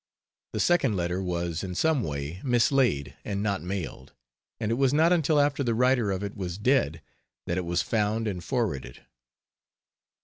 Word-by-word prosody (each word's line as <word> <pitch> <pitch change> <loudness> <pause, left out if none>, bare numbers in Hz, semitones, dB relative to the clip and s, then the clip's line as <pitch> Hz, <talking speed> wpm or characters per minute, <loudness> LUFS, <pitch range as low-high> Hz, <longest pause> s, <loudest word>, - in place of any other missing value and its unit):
The - - -2
second 140 -11 +3
letter 90 +1 -1
was, 85 -2 -2
in 90 -1 -5
some 160 - +2
way, 75 +1 -4
mislaid 120 - +2
and 100 0 -3
not 100 -2 0
mailed; 90 0 -5 0.5
and 110 0 -1
it - - +3
was 135 +2 +2
not 165 +3 +5
until 160 -3 +3
after 145 0 +2
the 115 -3 0
writer 125 -2 +3
of 95 0 -2
it 100 - -5
was 90 -2 -4
dead 105 - +1 0.4
that 85 +2 -1
it 90 - -4
was 85 0 0
found 110 0 0
and 90 -4 -3
forwarded. 90 - -3
105 Hz, 170 wpm, -27 LUFS, 90-130 Hz, 0.5 s, not